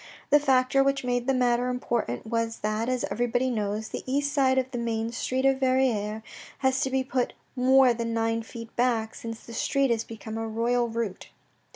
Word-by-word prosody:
The 295 Hz, -, +7 dB
factor 270 Hz, -1 st, +3 dB
which 275 Hz, 0 st, +1 dB
made 245 Hz, 0 st, -1 dB
the 270 Hz, -, +3 dB
matter 245 Hz, 0 st, +2 dB
important 235 Hz, -, -2 dB
was 230 Hz, 0 st, -2 dB
that, 215 Hz, +3 st, -1 dB
as 255 Hz, -1 st, 0 dB
everybody 245 Hz, +2 st, 0 dB
knows, 215 Hz, -1 st, -2 dB
the -, -, -5 dB
east 285 Hz, +1 st, 0 dB
side 265 Hz, -2 st, +3 dB
of 260 Hz, 0 st, 0 dB
the 245 Hz, -, -3 dB
main 230 Hz, -1 st, -2 dB
street 255 Hz, +2 st, -1 dB
of 270 Hz, -1 st, +3 dB
Verrieres 240 Hz, -5 st, +1 dB, 0.4 s
has 265 Hz, 0 st, +3 dB
to 265 Hz, -, +1 dB
be 265 Hz, 0 st, +1 dB
put 260 Hz, -2 st, -1 dB, 0.2 s
more 260 Hz, 0 st, +5 dB
than 230 Hz, 0 st, -3 dB
nine 225 Hz, 0 st, 0 dB
feet 230 Hz, 0 st, -10 dB
back 235 Hz, -3 st, +1 dB
since 225 Hz, -1 st, -7 dB
that 230 Hz, -, -11 dB
street 275 Hz, +3 st, +1 dB
has 230 Hz, -1 st, +1 dB
become 225 Hz, 0 st, -7 dB
a 225 Hz, -, -3 dB
royal 235 Hz, +2 st, +1 dB
route. 225 Hz, -4 st, -4 dB
240 Hz, 195 wpm, -27 LUFS, 225-260 Hz, 0.4 s, The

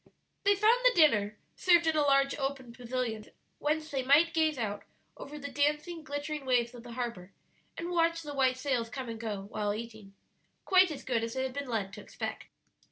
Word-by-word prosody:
They 405 Hz, 0 st, +5 dB
found 435 Hz, +5 st, +4 dB
the -, -, +5 dB
dinner 210 Hz, -10 st, +4 dB, 0.2 s
served 345 Hz, -2 st, +4 dB
in 320 Hz, -1 st, +2 dB
a 305 Hz, -, +3 dB
large 275 Hz, -1 st, +3 dB
open 270 Hz, -3 st, -3 dB
pavilion, 240 Hz, -3 st, -3 dB, 0.3 s
whence 310 Hz, +1 st, -1 dB
they 270 Hz, -2 st, 0 dB
might 295 Hz, +6 st, +4 dB
gaze 315 Hz, -3 st, +2 dB
out 205 Hz, -4 st, -3 dB, 0.3 s
over 295 Hz, +2 st, -9 dB
the 285 Hz, -1 st, -7 dB
dancing, 300 Hz, +4 st, 0 dB
glittering 290 Hz, 0 st, -4 dB
waves 245 Hz, -2 st, +1 dB
of 240 Hz, -, -10 dB
the 240 Hz, 0 st, -10 dB
harbor, 230 Hz, -7 st, -5 dB, 0.4 s
and 340 Hz, +1 st, -4 dB
watch 335 Hz, -1 st, +1 dB
the 295 Hz, -1 st, -6 dB
white 260 Hz, -2 st, +2 dB
sails 255 Hz, -4 st, -1 dB
come 260 Hz, 0 st, -6 dB
and 225 Hz, -1 st, -6 dB
go, 210 Hz, -3 st, -4 dB
while 205 Hz, -1 st, -1 dB
eating 220 Hz, -3 st, -9 dB, 0.5 s
quite 370 Hz, -1 st, +5 dB
as 300 Hz, -, -6 dB
good 235 Hz, -3 st, 0 dB
as 230 Hz, +1 st, -4 dB
they 260 Hz, -, -1 dB
had 260 Hz, -1 st, -3 dB
been 280 Hz, -1 st, -5 dB
led 200 Hz, -4 st, -2 dB
to -, -, -8 dB
expect. -, -, -6 dB
270 Hz, 200 wpm, -30 LUFS, 230-310 Hz, 0.5 s, They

